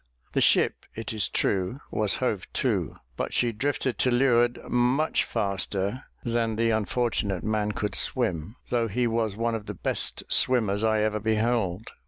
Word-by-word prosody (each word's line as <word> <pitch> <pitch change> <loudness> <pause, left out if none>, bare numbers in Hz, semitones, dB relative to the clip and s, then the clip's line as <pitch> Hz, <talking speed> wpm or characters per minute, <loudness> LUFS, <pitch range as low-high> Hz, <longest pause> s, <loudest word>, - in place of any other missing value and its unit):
The - - +1
ship, - - +2
it 115 0 -4
is 105 -3 +1
true, 95 +7 0
was 105 -2 +2
hove - - -2
to; - - 0 0.2
but - - -3
she 120 -1 +2
drifted 130 +2 -2
to 130 - +3
leeward 120 -1 +3
much 125 +6 +2
faster 100 +1 -2 0.2
than 115 -1 0
the 115 +1 +2
unfortunate 105 -3 0
man 105 -1 0
could 105 -2 -2
swim, 80 - 0
though 120 -2 +1
he 120 +4 0
was 115 -3 0
one 115 0 0
of 110 -2 -4
the - - -5
best - - 0
swimmers 110 -5 +2
I 110 -1 +2
ever 105 0 0
beheld. 110 -2 0
110 Hz, 160 wpm, -26 LUFS, 105-120 Hz, 0.2 s, to